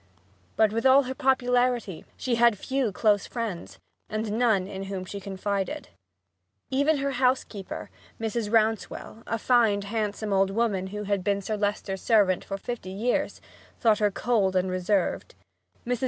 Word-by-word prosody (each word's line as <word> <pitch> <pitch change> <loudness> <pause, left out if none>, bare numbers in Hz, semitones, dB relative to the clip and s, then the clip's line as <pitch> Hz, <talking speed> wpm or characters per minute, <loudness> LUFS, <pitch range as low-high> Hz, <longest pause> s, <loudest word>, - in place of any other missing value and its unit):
But 220 -1 +3
with 230 - -1
all 265 +1 +6
her 260 0 -4
popularity 250 -7 +1
she 255 - -2
had 235 -2 +4
few 260 +1 -1
close 205 +1 +2
friends, 225 -8 -5 0.3
and 215 0 -2
no 240 +3 +2
one 200 -5 +3
in 195 -1 -6
whom 195 -1 -5
she 200 +2 -6
confided. 195 0 -3 0.8
Even 285 +3 +3
her 280 0 -1
housekeeper, 250 -6 -1 0.3
Mrs. 225 -1 -2
Rouncewell, 225 0 0
a 230 - -1
fine, 225 -4 +3
handsome 210 0 -2
old 195 0 +3
woman 200 -3 0
who 210 +2 -5
had 200 -2 -1
been 200 +1 +1
Sir 215 +2 -3
Leicester's 205 -2 -2
servant 200 -5 +3
for 195 - -5
fifty 230 -2 -6
years, 215 +6 -1 0.4
thought 220 -3 +3
her 210 -1 +3
cold 200 -2 +1
and 185 0 +1
reserved. 185 +1 -1 0.5
Mrs. 245 -1 -1
215 Hz, 155 wpm, -26 LUFS, 195-240 Hz, 0.8 s, all